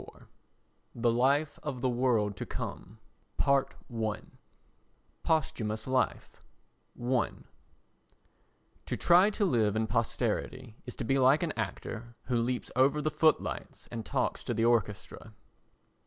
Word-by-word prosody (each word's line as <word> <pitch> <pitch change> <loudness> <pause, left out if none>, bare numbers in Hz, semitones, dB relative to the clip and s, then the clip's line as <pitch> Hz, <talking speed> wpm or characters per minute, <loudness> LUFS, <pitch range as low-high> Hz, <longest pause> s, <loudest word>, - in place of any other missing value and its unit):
XXIV - - -14 0.7
The 120 0 +2
Life 140 +6 +2
of 135 -5 -5
the 130 - +2
World 120 -5 +1
to - - -4
Come - - -6 0.4
Posthumous 115 -5 -1 1.6
Life 130 -1 -1 0.6
i 125 0 +1 1.6
To - - -2
try 180 +4 +5
to 210 0 0
live 110 - +2
in 110 0 +1
posterity 115 +1 -2
is 125 - -6
to - - -4
be 135 +4 +1
like 135 +5 +5
an 165 - 0
actor 120 +1 -5
who 120 -2 0
leaps 125 +1 -2
over 135 +4 +4
the 155 +1 -1
footlights 155 0 0
and 115 -2 -4
talks 130 +2 -1
to 120 - -2
the 115 +1 +2
orchestra. 110 -1 -1
125 Hz, 125 wpm, -30 LUFS, 115-135 Hz, 1.6 s, try